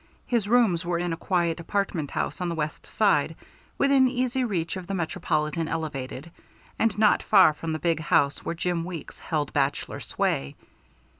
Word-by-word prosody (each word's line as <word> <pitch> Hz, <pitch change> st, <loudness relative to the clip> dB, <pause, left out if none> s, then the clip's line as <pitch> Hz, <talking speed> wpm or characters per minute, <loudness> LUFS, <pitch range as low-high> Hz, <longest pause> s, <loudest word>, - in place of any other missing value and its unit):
His 230 Hz, -5 st, 0 dB
rooms 220 Hz, -8 st, +3 dB
were 175 Hz, -1 st, -1 dB
in 175 Hz, 0 st, -1 dB
a -, -, -1 dB
quiet 170 Hz, -1 st, 0 dB
apartment 170 Hz, -4 st, -2 dB
house -, -, -3 dB
on 180 Hz, -, -1 dB
the 170 Hz, -, -2 dB
West 155 Hz, -1 st, -4 dB
Side, -, -, +2 dB, 0.4 s
within 275 Hz, -2 st, +4 dB
easy 255 Hz, 0 st, 0 dB
reach 180 Hz, -8 st, -1 dB
of 185 Hz, -2 st, -7 dB
the 195 Hz, -, -2 dB
Metropolitan 165 Hz, -2 st, -1 dB
Elevated, 150 Hz, -1 st, -4 dB, 0.5 s
and 225 Hz, -2 st, +2 dB
not 210 Hz, -1 st, +4 dB
far 190 Hz, -7 st, +6 dB
from 160 Hz, +2 st, -5 dB
the 155 Hz, -, -1 dB
big 165 Hz, -1 st, 0 dB
house 145 Hz, -2 st, +2 dB
where 170 Hz, -, -3 dB
Jim 170 Hz, 0 st, -1 dB
Weeks 170 Hz, -3 st, -7 dB
held 150 Hz, -3 st, -2 dB
bachelor 140 Hz, 0 st, -1 dB
sway. 70 Hz, 0 st, -2 dB
170 Hz, 170 wpm, -26 LUFS, 155-200 Hz, 0.5 s, far